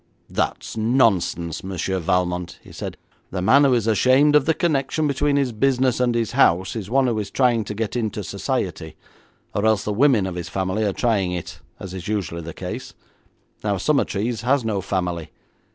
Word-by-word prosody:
'That - - 0
is - - -8
nonsense, 110 - +1
Monsieur 95 0 -2
Valmont,' 90 0 -1
he - - -14
said, - - -6 0.3
'the 95 - -3
man 135 +9 +6
who 130 -2 +4
is 115 -3 0
ashamed 130 +6 +4
of 150 -2 +5
the 160 - +4
connection 155 -1 0
between 145 0 +1
his 140 -3 +1
business 130 +2 +1
and 125 -1 +2
his 115 -1 0
house 95 -8 +3
is 105 -3 -5
one 135 +2 +3
who 115 -3 0
is 100 -2 -4
trying 120 0 +2
to 105 +1 -6
get 110 +1 -3
into 110 -3 -2
Society, 80 - -3 0.6
or 100 - -1
else 110 -1 +3
the 105 - -1
women 120 -3 +4
of 95 - -3
his 90 -1 -5
family 95 +3 -1
are 100 - +1
trying 100 -4 0
it, 90 -2 -6 0.2
as 95 -1 -7
is 90 -2 -7
usually 95 -5 -2
the 85 +1 -7
case. - - -7 0.7
Now 100 -2 0
Summertrees 115 -1 0
has 130 +1 +1
no 105 -3 -1
family. 90 -4 -2
110 Hz, 190 wpm, -22 LUFS, 95-130 Hz, 0.7 s, man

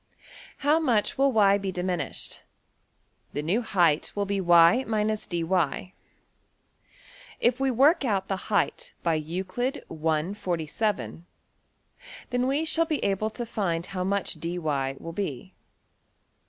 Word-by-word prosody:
How 300 +2 +5
much 240 -10 +1
will~$y$ 215 -7 +4
be 195 -1 -3
diminished? 180 -1 -3 0.9
The 145 - -2
new 190 +10 +1
height 175 -9 +2
will 205 0 0
be 200 0 -1
$y 175 +6 +6
dy$. 190 - -1 1.5
If 245 +1 +2
we 270 0 +2
work 275 +7 +4
out 195 -6 0
the 195 -1 -4
height 205 - 0
by 170 - +2
Euclid 185 - -3
I.~47, 165 +4 -2 1.1
then 250 +1 +1
we 285 +4 +1
shall 330 +1 +2
be 310 -2 -2
able 200 +2 0
to 240 +2 -5
find 175 -7 -2
how 185 -1 -3
much 200 +1 -1
$dy$~will 155 -3 -3
be. 185 -2 -4
195 Hz, 115 wpm, -27 LUFS, 170-230 Hz, 1.5 s, $y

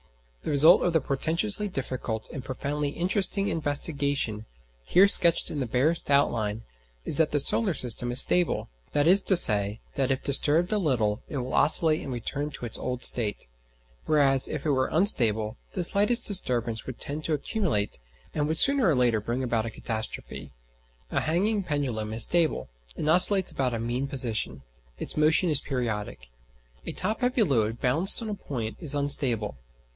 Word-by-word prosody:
The - - -6
result 155 +3 +5
of 175 - 0
the 160 - +3
portentously 165 +10 -1
difficult 130 - -5
and 135 -5 -7
profoundly 145 +3 -4
interesting 190 +5 -1
investigation, 140 -7 -2 0.4
here 190 - +4
sketched 170 -4 +4
in 145 -3 -3
barest 140 +9 0
outline, 115 -6 0 0.4
is - - 0
that 160 -2 +2
the 145 - +1
solar 190 +5 +2
system 120 -1 +1
is 125 +2 +8
stable: 180 -2 0 0.3
that 145 0 +1
is 190 +4 +6
to 190 - +3
say, 105 -6 +4
that 135 -2 -1
if 135 0 -2
disturbed 155 +6 +2
a 215 - +1
little 115 - -1
it 145 - -5
will 125 0 -5
oscillate 155 +1 +3
and 135 - -7
return 135 +4 -4
to 135 - -8
its 115 - -2
old 125 0 -5
state; 110 -4 +2 0.6
whereas 140 -3 +2
if 150 - -6
it 150 - +1
were 130 -1 0
unstable 115 - +2 0.2
the 180 - -3
slightest 205 +7 +2
disturbance 120 - -1
would 130 - -8
tend 150 +2 -6
to 160 - -1
accumulate, 150 - -2 0.3
and 150 -1 -1
would 160 +1 -2
sooner 275 - +5
or 160 - +2
later 120 -4 +1
bring 120 +5 -3
about 115 -2 -1
a - - -4
catastrophe. 110 0 -7 0.6
A - - 0
hanging 200 +7 0
pendulum 130 - -3
is 110 +1 0
stable, 170 -2 0 0.3
and 150 - -4
oscillates 185 +3 +3
about 125 -3 -2
a - - -4
mean 120 +4 -3
position; 110 - -2 0.3
its - - -5
motion 155 +3 +2
is 145 - +3
periodic. 105 - -5 0.6
A - - -2
top 215 +6 -2
heavy 250 -2 +1
load 115 - 0
balanced 160 - +3
on 220 - -5
a - - -3
point 120 - -6
is 150 -4 -1
unstable. 125 - -1
140 Hz, 170 wpm, -26 LUFS, 120-165 Hz, 0.6 s, is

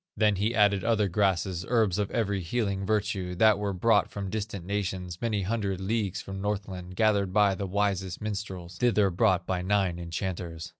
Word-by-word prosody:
Then 105 -2 +3
he 110 +5 0
added 100 -3 +3
other 110 -3 +2
grasses, 95 -2 0
Herbs 110 -5 +2
of 100 - 0
every 100 -4 -1
healing 100 +1 -2
virtue, 100 -4 -1
That 110 +2 +4
were 100 -1 -1
brought 105 +3 +2
from 100 -2 -5
distant 105 -4 -4
nations, 95 -3 -3
Many 105 -4 0
hundred 100 -2 -1
leagues 100 0 -1
from 95 0 -7
Northland, 95 -3 -4
Gathered 100 -2 +2
by 100 0 +4
the 100 +1 -4
wisest 95 -2 -1
minstrels, 95 -5 -5
Thither 105 -5 +3
brought 95 -1 +2
by 90 -1 -1
nine 95 -2 +1
enchanters. 85 -1 -4
100 Hz, 170 wpm, -28 LUFS, 90-105 Hz, -, That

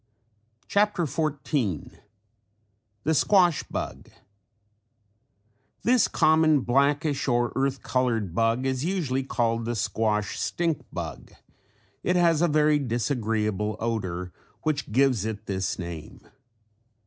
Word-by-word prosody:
CHAPTER 205 -3 +2
XIV 145 - -2 1.0
THE 160 - +2
SQUASH 175 0 +4
BUG - - -5 1.7
This 245 -1 +4
common 155 -2 +4
blackish 140 +3 +1
or 120 -1 +1
earth 135 0 -1
colored 115 -7 0
bug 115 +5 +1
is 130 0 -1
usually 160 -8 -1
called 115 -3 -1
the 120 +1 -2
squash 105 -1 -1
stink 165 -3 -1
bug. - - -7 0.7
It 180 - +1
has 170 -3 +3
a 175 - +4
very 150 -1 +3
disagreeable 110 -5 -1
odor 95 -6 -3 0.3
which 150 -7 -1
gives 130 -3 +3
it 110 -1 -4
this 95 -1 -2
name. 85 -3 -8
130 Hz, 105 wpm, -26 LUFS, 110-155 Hz, 1.7 s, SQUASH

